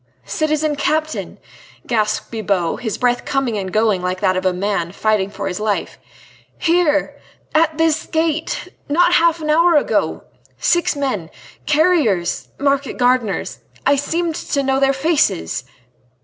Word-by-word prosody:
"Citizen 310 Hz, -1 st, 0 dB
Captain," 310 Hz, +2 st, -2 dB, 0.5 s
gasped 215 Hz, -2 st, -1 dB
Bibot, 200 Hz, -6 st, -1 dB
his 220 Hz, -4 st, -3 dB
breath 245 Hz, -1 st, +1 dB
coming 270 Hz, -5 st, -1 dB
and 190 Hz, -2 st, -3 dB
going 215 Hz, -3 st, +2 dB
like 180 Hz, +1 st, -2 dB
that 185 Hz, -, +2 dB
of 185 Hz, 0 st, 0 dB
a -, -, +3 dB
man 180 Hz, -2 st, -2 dB
fighting 210 Hz, -1 st, 0 dB
for 200 Hz, -1 st, -5 dB
his 185 Hz, +1 st, -3 dB
life. 210 Hz, -1 st, -2 dB, 0.6 s
"Here!... 330 Hz, -3 st, +1 dB, 0.3 s
at 315 Hz, 0 st, +2 dB
this 320 Hz, -1 st, +1 dB
gate!... 320 Hz, 0 st, -1 dB, 0.2 s
not 350 Hz, +4 st, +3 dB
half 335 Hz, -1 st, +3 dB
an 305 Hz, 0 st, 0 dB
hour 335 Hz, +2 st, +4 dB
ago... 295 Hz, -, +1 dB, 0.3 s
six 345 Hz, -2 st, +1 dB
men... 255 Hz, -, -2 dB, 0.4 s
carriers... 295 Hz, -, +2 dB
market 280 Hz, 0 st, 0 dB
gardeners... 245 Hz, -4 st, 0 dB, 0.3 s
I 285 Hz, -, +5 dB
seemed 325 Hz, +4 st, -1 dB
to 280 Hz, -2 st, -2 dB
know 265 Hz, 0 st, +1 dB
their 270 Hz, 0 st, +4 dB
faces...." 270 Hz, -, 0 dB
270 Hz, 140 wpm, -19 LUFS, 205-310 Hz, 0.6 s, I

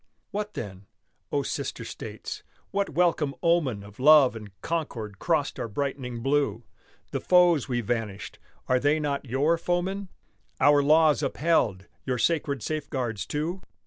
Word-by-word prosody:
What 210 Hz, +1 st, -4 dB
then? 95 Hz, -3 st, -7 dB, 0.4 s
Oh, -, -, +1 dB
sister -, -, -4 dB
States! -, -, -7 dB, 0.3 s
what 200 Hz, 0 st, 0 dB
welcome 165 Hz, -5 st, +1 dB
omen 155 Hz, -12 st, +2 dB
Of 100 Hz, +2 st, -14 dB
love 145 Hz, -2 st, +7 dB
and 105 Hz, -2 st, -8 dB
concord 115 Hz, -12 st, -3 dB
crossed 155 Hz, -5 st, 0 dB
our -, -, -2 dB
brightening 125 Hz, -1 st, -4 dB
blue, 135 Hz, -5 st, +1 dB, 0.5 s
The -, -, -2 dB
foes 175 Hz, -6 st, +4 dB
we 120 Hz, -1 st, 0 dB
vanquished, 110 Hz, -3 st, -4 dB, 0.3 s
are 130 Hz, 0 st, +3 dB
they 145 Hz, +3 st, +2 dB
not 145 Hz, -2 st, -2 dB
your 145 Hz, +7 st, +1 dB
foemen, 185 Hz, +3 st, -1 dB, 0.5 s
Our 145 Hz, +1 st, +5 dB
laws 150 Hz, -1 st, +4 dB
upheld, 115 Hz, -, +1 dB, 0.2 s
your 130 Hz, -1 st, -1 dB
sacred 140 Hz, 0 st, 0 dB
safeguards, 130 Hz, -9 st, -3 dB
too? 165 Hz, +6 st, -3 dB
145 Hz, 140 wpm, -27 LUFS, 120-165 Hz, 0.5 s, love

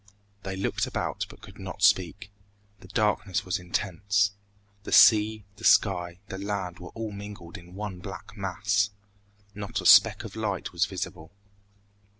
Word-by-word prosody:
They 95 Hz, -1 st, -5 dB
looked 95 Hz, -, -1 dB
about, -, -, -3 dB
but -, -, -14 dB
could -, -, -13 dB
not 95 Hz, 0 st, -7 dB
speak. 100 Hz, +1 st, +2 dB, 0.5 s
The 95 Hz, -, -14 dB
darkness 105 Hz, -1 st, 0 dB
was 90 Hz, -1 st, -1 dB
intense. 100 Hz, +2 st, 0 dB, 0.5 s
The -, -, -8 dB
sea, 105 Hz, +2 st, +6 dB
the 110 Hz, -, -14 dB
sky, 90 Hz, -6 st, +3 dB
the 95 Hz, -, -6 dB
land 100 Hz, -3 st, -4 dB
were 90 Hz, -, -9 dB
all 110 Hz, -1 st, -4 dB
mingled 100 Hz, -4 st, -9 dB
in 90 Hz, +1 st, -12 dB
one 100 Hz, -3 st, -5 dB
black 95 Hz, +2 st, -9 dB
mass. 100 Hz, +1 st, 0 dB, 0.6 s
Not 100 Hz, -1 st, -4 dB
a -, -, -6 dB
speck -, -, +7 dB
of -, -, -9 dB
light 105 Hz, -4 st, -3 dB
was 90 Hz, +4 st, +1 dB
visible. 90 Hz, -4 st, -6 dB
100 Hz, 150 wpm, -27 LUFS, 90-105 Hz, 0.6 s, speck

